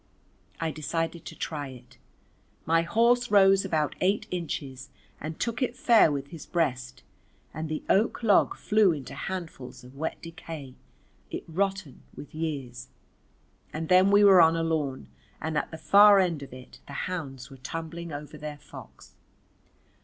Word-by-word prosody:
I 165 Hz, -1 st, -1 dB
decided 165 Hz, +2 st, -3 dB
to -, -, -8 dB
try 145 Hz, -3 st, -4 dB
it. 125 Hz, -1 st, -14 dB, 0.7 s
My 165 Hz, +1 st, +3 dB
horse 235 Hz, +8 st, +2 dB
rose 195 Hz, -1 st, +5 dB
about 155 Hz, -2 st, 0 dB
eight 195 Hz, +3 st, +1 dB
inches 140 Hz, -7 st, -5 dB, 0.3 s
and 155 Hz, +2 st, -6 dB
took 235 Hz, +3 st, -2 dB
it 255 Hz, -1 st, -1 dB
fair 230 Hz, -10 st, +5 dB
with 140 Hz, -1 st, -4 dB
his 165 Hz, -4 st, -10 dB
breast, 130 Hz, -6 st, -2 dB, 0.5 s
and 155 Hz, +1 st, -5 dB
the 155 Hz, -, -4 dB
oak 220 Hz, +4 st, +1 dB
log 210 Hz, -3 st, +4 dB
flew 210 Hz, -4 st, +3 dB
into 140 Hz, -3 st, -7 dB
handfuls 155 Hz, -6 st, -7 dB
of 125 Hz, +2 st, -14 dB
wet 160 Hz, +3 st, -4 dB
decay 165 Hz, -5 st, -9 dB, 0.6 s
it -, -, -5 dB
rotten 190 Hz, -3 st, -2 dB
with 145 Hz, -, -11 dB
years. 135 Hz, -6 st, -5 dB, 0.9 s
And 160 Hz, +1 st, -4 dB
then 185 Hz, +1 st, +6 dB
we 205 Hz, +1 st, +5 dB
were 195 Hz, -3 st, +8 dB
on 165 Hz, 0 st, +5 dB
a 165 Hz, -, -1 dB
lawn 150 Hz, -5 st, -2 dB, 0.3 s
and 160 Hz, 0 st, -4 dB
at -, -, -1 dB
the 160 Hz, -, -8 dB
far 200 Hz, +5 st, +7 dB
end 175 Hz, -6 st, +1 dB
of 140 Hz, -, -9 dB
it 130 Hz, 0 st, -13 dB
the 140 Hz, -, -9 dB
hounds 135 Hz, -9 st, -6 dB
were 135 Hz, -, -11 dB
tumbling 165 Hz, +5 st, -6 dB
over 150 Hz, +1 st, -8 dB
their 150 Hz, 0 st, -6 dB
fox. -, -, -14 dB
160 Hz, 160 wpm, -27 LUFS, 140-185 Hz, 0.9 s, were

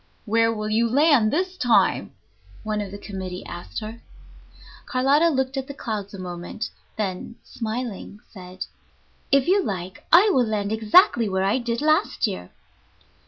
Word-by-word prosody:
"Where 225 Hz, +1 st, +3 dB
will 215 Hz, -1 st, -3 dB
you 230 Hz, +2 st, +2 dB
land 280 Hz, -3 st, +4 dB
this 370 Hz, +3 st, -1 dB
time?" 225 Hz, -, +2 dB, 0.5 s
one 215 Hz, -1 st, -2 dB
of 200 Hz, -, -5 dB
the 200 Hz, -, -8 dB
committee 190 Hz, -3 st, -7 dB
asked 175 Hz, +5 st, -7 dB
her. 220 Hz, +2 st, -8 dB, 0.9 s
Carlotta 280 Hz, +6 st, +3 dB
looked 265 Hz, -2 st, -1 dB
at 265 Hz, 0 st, -3 dB
the 280 Hz, -, -8 dB
clouds 210 Hz, -6 st, -4 dB
a -, -, -8 dB
moment, 180 Hz, +3 st, -6 dB, 0.3 s
then, 200 Hz, +1 st, -4 dB
smiling, 225 Hz, -3 st, -5 dB
said, 185 Hz, -2 st, -8 dB, 0.7 s
"If 275 Hz, -1 st, +4 dB
you 390 Hz, +3 st, +4 dB
like, 185 Hz, -, -5 dB
I 390 Hz, +6 st, +7 dB
will 250 Hz, -3 st, +3 dB
land 205 Hz, -1 st, -1 dB
exactly 220 Hz, -, +4 dB
where 190 Hz, 0 st, 0 dB
I 200 Hz, +6 st, +2 dB
did 235 Hz, 0 st, -2 dB
last 310 Hz, +1 st, +2 dB
year." 90 Hz, 0 st, -4 dB
220 Hz, 155 wpm, -24 LUFS, 200-265 Hz, 0.9 s, I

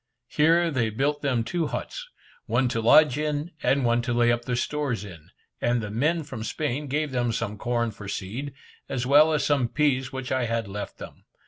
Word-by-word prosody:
Here 165 Hz, +2 st, +3 dB
they 120 Hz, -6 st, 0 dB
built 145 Hz, +6 st, -1 dB
them 130 Hz, -5 st, +1 dB
two 165 Hz, +6 st, -1 dB
huts, -, -, -5 dB, 0.4 s
one 130 Hz, -, +2 dB
to 115 Hz, -2 st, -1 dB
lodge 145 Hz, +4 st, +5 dB
in, 150 Hz, +2 st, -2 dB
and 135 Hz, -1 st, +2 dB
one 120 Hz, 0 st, +2 dB
to 120 Hz, 0 st, -2 dB
lay 120 Hz, 0 st, +3 dB
up 120 Hz, 0 st, -1 dB
their 125 Hz, -, -1 dB
stores 125 Hz, -4 st, -2 dB
in; 85 Hz, -6 st, -12 dB, 0.3 s
and 120 Hz, 0 st, +2 dB
the 105 Hz, -2 st, -5 dB
men 155 Hz, +9 st, +1 dB
from 130 Hz, -6 st, -7 dB
Spain 145 Hz, +3 st, -3 dB
gave 150 Hz, +1 st, -1 dB
them 120 Hz, -2 st, 0 dB
some 115 Hz, -2 st, -3 dB
corn 120 Hz, +1 st, -1 dB
for 105 Hz, -1 st, -10 dB
seed, 110 Hz, +9 st, -4 dB, 0.4 s
as 125 Hz, -2 st, -2 dB
well 150 Hz, +4 st, +6 dB
as 150 Hz, -3 st, +1 dB
some 140 Hz, -5 st, +2 dB
peas 135 Hz, -2 st, +1 dB
which 130 Hz, -1 st, -5 dB
I 130 Hz, -2 st, +1 dB
had 115 Hz, -2 st, -2 dB
left 100 Hz, +1 st, -6 dB
them. -, -, -11 dB
125 Hz, 205 wpm, -26 LUFS, 115-150 Hz, 0.4 s, well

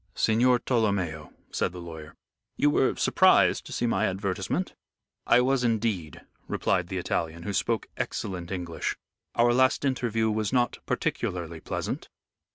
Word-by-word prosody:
"Signor 120 Hz, +3 st, +4 dB
Tolomeo," 100 Hz, -, -1 dB, 0.2 s
said -, -, -1 dB
the 90 Hz, -, -7 dB
lawyer, 80 Hz, -3 st, -9 dB, 0.4 s
"you 145 Hz, -, +4 dB
were 130 Hz, -, +2 dB
surprised -, -, +4 dB
to -, -, -10 dB
see -, -, -1 dB
my 110 Hz, -2 st, +2 dB
advertisement?" 95 Hz, 0 st, -2 dB, 0.5 s
"I 125 Hz, -, +6 dB
was 130 Hz, 0 st, +2 dB
indeed," 110 Hz, -8 st, -1 dB, 0.3 s
replied 90 Hz, -2 st, 0 dB
the 95 Hz, -, -4 dB
Italian, 85 Hz, -1 st, -2 dB
who 100 Hz, -, -3 dB
spoke 115 Hz, +4 st, 0 dB
excellent 90 Hz, -4 st, -3 dB
English. 90 Hz, -3 st, -3 dB, 0.4 s
"Our 120 Hz, 0 st, +4 dB
last 130 Hz, +2 st, +3 dB
interview 115 Hz, -4 st, +1 dB
was 105 Hz, -1 st, -1 dB
not 125 Hz, -2 st, +1 dB
particularly 85 Hz, -2 st, -2 dB
pleasant." -, -, -4 dB
105 Hz, 140 wpm, -27 LUFS, 85-120 Hz, 0.5 s, I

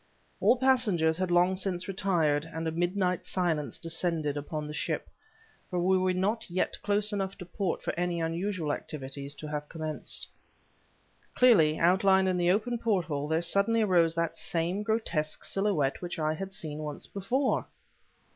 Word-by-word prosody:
All 255 Hz, -, +4 dB
passengers 210 Hz, -11 st, +3 dB
had 185 Hz, -1 st, 0 dB
long 175 Hz, +2 st, +4 dB
since 185 Hz, -1 st, -2 dB
retired, 165 Hz, -6 st, +1 dB
and 160 Hz, 0 st, -3 dB
a -, -, 0 dB
midnight 180 Hz, +2 st, 0 dB
silence 165 Hz, -5 st, -1 dB
descended 165 Hz, -3 st, -1 dB
upon 150 Hz, +1 st, -4 dB
the 150 Hz, -, -6 dB
ship, -, -, -2 dB, 0.6 s
for 180 Hz, -, -3 dB
we 185 Hz, +2 st, +3 dB
were 185 Hz, 0 st, +2 dB
not 195 Hz, +5 st, -1 dB
yet 180 Hz, +2 st, -1 dB
close 205 Hz, +1 st, +1 dB
enough 195 Hz, -1 st, -2 dB
to 180 Hz, -, -8 dB
port 180 Hz, 0 st, -3 dB
for -, -, -2 dB
any 175 Hz, 0 st, -1 dB
unusual 165 Hz, -1 st, -1 dB
activities 140 Hz, -1 st, -6 dB
to 155 Hz, -, -8 dB
have 150 Hz, 0 st, -4 dB
commenced. 155 Hz, -2 st, -3 dB, 1.1 s
Clearly 165 Hz, -12 st, +5 dB
outlined 190 Hz, +2 st, +4 dB
in 185 Hz, -, 0 dB
the 175 Hz, 0 st, +2 dB
open 230 Hz, +5 st, +1 dB
porthole 170 Hz, -10 st, 0 dB
there 160 Hz, +2 st, +1 dB
suddenly 200 Hz, +6 st, +3 dB
arose 170 Hz, -5 st, +3 dB
that 165 Hz, -1 st, -1 dB
same 175 Hz, +4 st, -1 dB
grotesque 200 Hz, -8 st, -1 dB
silhouette 195 Hz, -9 st, 0 dB
which 175 Hz, -1 st, -4 dB
I 155 Hz, -1 st, 0 dB
had 195 Hz, +4 st, -6 dB
seen 155 Hz, -5 st, -4 dB
once 150 Hz, -1 st, -5 dB
before. 250 Hz, +8 st, -1 dB
175 Hz, 160 wpm, -29 LUFS, 160-195 Hz, 1.1 s, Clearly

